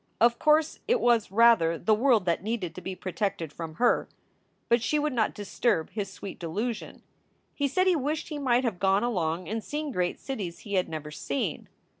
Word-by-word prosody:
Of 235 +1 +4
course, 305 0 +3
it 485 +2 +3
was, 235 - +2
rather, 205 -7 +5
the 215 +7 +2
world 225 -3 +3
that 170 -2 +1
needed 200 -5 -3
to 185 - -8
be 190 0 -5
protected 185 -5 -3
from 160 -2 -7
her. 245 +8 +2 0.6
But 235 0 +3
she 300 - +1
would 300 -1 0
not 225 -3 0
disturb 205 -4 0
his 205 -3 -3
sweet 195 - -8
delusion. 210 +7 -4 0.5
He 285 - 0
said 370 +8 +1
he 370 -2 +4
wished 300 +2 -2
he 300 -2 -4
might 255 -2 +2
have 220 -8 -2
gone 195 +2 +3
along 180 -7 -1
and 220 +1 -3
seen 300 0 -4
great 180 -6 -1
cities 200 -11 -5
he 205 - -7
had 185 -2 +1
never 155 -2 -6
seen. 140 -2 -3
215 Hz, 195 wpm, -28 LUFS, 180-255 Hz, 0.6 s, rather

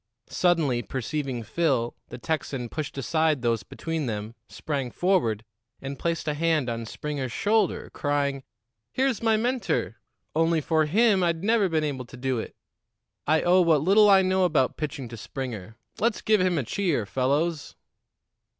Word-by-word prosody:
Suddenly 160 -9 +2
perceiving 130 +2 -3
Phil, 130 -4 0
the - - -7
Texan 135 -3 -3
pushed 150 0 -5
aside 155 0 +1
those 115 -3 +1
between 160 +7 -4
them, 105 0 -4 0.2
sprang 140 -5 -3
forward 120 - +1 0.3
and 135 0 -6
placed 165 -2 -2
a 150 - +1
hand 155 -4 +1
on 115 -1 -4
Springer's 140 -1 -4
shoulder, 215 - 0
crying: 140 -1 -1 0.5
"Here's 260 -4 0
my 225 -1 +3
mentor. 245 +3 -1 0.4
Only 165 0 +3
for 155 0 +1
him, 205 +3 +3
I'd 170 -1 0
never 215 -2 +3
been 160 -2 +1
able 135 -4 -3
to 125 - -12
do 130 -1 -1
it. - - -7 0.7
I 155 +1 +3
owe 180 +1 +5
what 160 -4 +4
little 205 +4 +6
I 195 -1 +6
know 185 0 +2
about 155 -7 +2
pitching 145 -3 -4
to 115 - -8
Springer. 110 -3 -6 0.2
Let's 230 0 +1
give 215 -3 +3
him 185 -2 +2
a 140 - 0
cheer, 160 - -1
fellows." 145 - -1
155 Hz, 160 wpm, -26 LUFS, 130-175 Hz, 0.7 s, little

